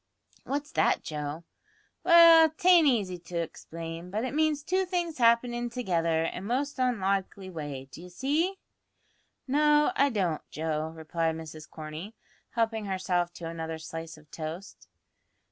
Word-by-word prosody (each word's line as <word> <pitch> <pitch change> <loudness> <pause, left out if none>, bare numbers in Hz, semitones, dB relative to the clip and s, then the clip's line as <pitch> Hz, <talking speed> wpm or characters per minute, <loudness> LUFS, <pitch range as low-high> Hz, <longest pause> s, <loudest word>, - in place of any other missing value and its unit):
"What's 290 +2 -3
that, - - +2
Joe?" 150 +1 -5 0.6
"Well, 335 -2 +8
t'ain't 350 -3 +6
easy 200 -9 +1
to 170 0 -7
explain, 165 +1 -6
but 215 +6 -2
it 255 - -4
means 305 -1 +1
two 370 +4 +1
things 345 -5 -2
happenin' 240 +1 +3
together 170 -9 0
in 165 - -3
a - - -9
most 260 +7 -2
onlikely 195 -5 -1
way 145 -5 -6
d'ye 175 +6 -10
see?" 295 - -1 0.9
"No, 295 +2 +4
I 280 +1 +4
don't, 185 - -1
Joe," 155 0 -2
replied 160 0 -1
Mrs 155 -1 -9
Corney, 155 +7 -8 0.3
helping 225 -2 -1
herself 185 -2 -1
to 170 - -7
another 165 -1 -5
slice 160 0 -7
of 150 -2 -20
toast. 165 +4 -7
190 Hz, 140 wpm, -28 LUFS, 165-270 Hz, 0.9 s, Well